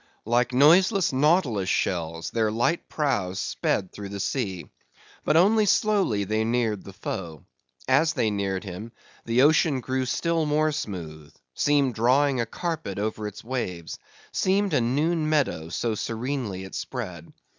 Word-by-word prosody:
Like 120 +2 +2
noiseless 175 - +4
nautilus 130 - +2
shells, 85 -2 -1
their 110 -2 +1
light 120 +10 0
prows 105 - -1
sped 95 - -1
through 100 -1 -8
the 100 0 -6
sea; 95 -6 -2 0.6
but 155 - +3
only 210 +4 +4
slowly 195 - +2
they 110 +2 0
neared 115 -3 0
the 100 - -11
foe. 85 -5 -6 0.4
As 155 +5 +3
they 115 -7 +1
neared 100 -2 -2
him, 105 +4 -8 0.3
the 120 +3 +3
ocean 150 -2 +4
grew 130 +1 -2
still 165 +4 0
more 155 +1 +2
smooth; 80 - -6 0.2
seemed 140 - +2
drawing 130 +3 +2
a 115 - -2
carpet 160 - -4
over 110 +1 -2
its 105 - -9
waves; 110 -9 -4 0.3
seemed 195 +1 +1
a - - +3
noon 155 +6 +1
meadow, 105 - 0
so 115 +6 -1
serenely 115 -2 -3
it 95 - -10
spread. 90 -10 -6
120 Hz, 145 wpm, -25 LUFS, 100-150 Hz, 0.6 s, noiseless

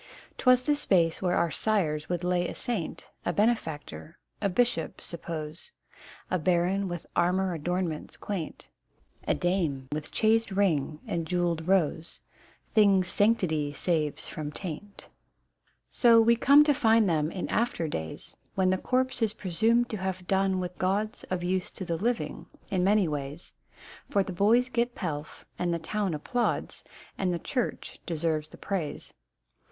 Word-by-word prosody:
'Twas 255 -1 +5
the 295 +2 +2
space 170 - +2
where 180 -1 +1
our 170 -2 +1
sires 160 -9 0
would 175 -1 -2
lay 180 0 +1
a - - -6
saint, 215 -10 -3 0.2
A - - 0
benefactor, 170 -7 -1
— - - -43
a 200 - +2
bishop, 235 -4 0
suppose, 165 - -7 0.6
A 185 - +2
baron 180 +4 +1
with 175 -2 -5
armour 185 +1 +2
adornments 170 0 -3
quaint, 190 -6 -5 0.6
Dame 165 -8 0
with 150 0 -4
chased 225 +1 +3
ring 160 -7 0
and 165 -1 -2
jewelled 175 -2 0
rose, 170 -3 0 0.5
Things 195 -4 +4
sanctity 170 -8 +1
saves 155 -2 0
from 150 -1 -5
taint; 190 +4 -7 0.8
So 235 -2 +6
we 230 +1 +5
come 280 +5 +7
to 300 -1 +3
find 225 -4 +4
them 155 -3 +1
in 180 +1 -4
after 225 -8 0
days 80 - -6 0.2
When 185 -1 +3
the 185 - +1
corpse 255 0 0
is 220 -2 +2
presumed 225 +6 +2
to 215 - -3
have 185 -1 -3
done 190 0 +1
with 180 -1 -5
gauds 200 +4 -1
Of 185 -1 -3
use 185 0 -1
to 190 - -7
the 170 -1 -1
living, 235 +6 -2 0.2
in 185 -2 +1
many 200 -1 +4
ways: 145 +2 -5 0.6
For 200 - +2
the 190 - -6
boys 225 +7 +4
get 240 -1 -1
pelf, 150 -4 -5
and 175 -1 0
the 170 - +1
town 190 +1 -2
applauds, 240 - -2 0.4
And 185 -2 +1
the 175 - 0
church 250 +6 -3
deserves 155 -2 -1
the - - -13
praise. 180 -7 -4
185 Hz, 155 wpm, -28 LUFS, 165-215 Hz, 0.8 s, come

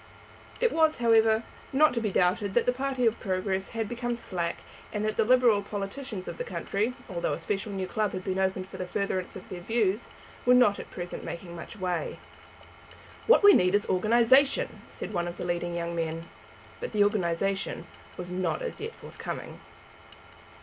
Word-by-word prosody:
It 480 -2 +3
was, 315 -1 +3
however, 225 -1 +4 0.3
not 300 +1 +5
to 235 - -1
be 215 - 0
doubted 190 +3 +1
that 240 - +4
the 250 - +3
party 260 -1 -1
of 225 0 +2
Progress 190 0 -1
had 225 -2 -2
become 240 +1 -2
slack, 175 -7 -3 0.3
and 210 0 -2
that 215 - -1
the - - +3
Liberal 240 -3 +5
politicians 200 +1 -5
of - - -6
the - - -1
country, 230 - -2
although 175 -3 -2
a - - -2
special 205 0 -3
new 190 -1 -2
club 210 +1 -1
had 185 - -4
been 190 0 -1
opened 190 -1 0
for - - -10
the 185 - -4
furtherance 185 -1 -2
of - - -9
their 180 -3 -6
views, 215 +1 0 0.3
were 250 0 +6
not 245 -5 +5
at - - -8
present 175 -1 -6
making 170 0 -7
much 170 +6 -9
way. 180 -3 -2 1.1
"What 475 -1 +6
we 405 0 +10
want 180 +2 +4
is 205 - +2
organization," 235 +8 +3
said - - -7
one 175 -2 0
of 175 - -6
the - - -4
leading 175 0 -2
young 170 0 -3
men. 165 0 -3 0.5
But - - -5
the 210 -1 +5
organization 195 -1 0 0.3
was 180 0 -6
not 185 - -1
as 485 - -5
yet 450 +2 -5
forthcoming. - - -7
205 Hz, 185 wpm, -28 LUFS, 185-235 Hz, 1.1 s, we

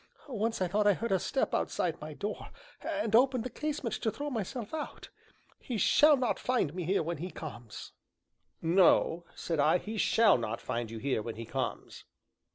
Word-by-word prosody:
Once 225 -5 -1
I - - +1
thought 205 +4 +2
I 205 - +6
heard 230 +3 -3
a 190 - +3
step 270 - -1
outside - - -1
my - - -7
door, - - -4 0.3
and 300 -9 -1
opened 255 -1 +4
the 250 - -5
casement 295 -3 -3
to 220 - +1
throw 290 +6 -4
myself 230 - -4
out; 310 -1 -6 0.5
he 245 - -4
shall 295 +9 +6
not 250 -3 0
find 245 - 0
me 180 -1 -4
here 185 0 +1
when 170 +2 -3
he 175 +5 -5
comes." 120 - -8 0.7
"No," 170 0 +4
said 165 -3 -3
I, 155 +4 +5
"he 215 +4 -5
shall 220 - +5
not 115 0 -3
find 115 -1 -3
you 115 - -6
here 130 -1 -1
when 115 +1 -5
he 115 +1 -6
comes." 130 +1 -4
200 Hz, 185 wpm, -31 LUFS, 155-245 Hz, 0.7 s, I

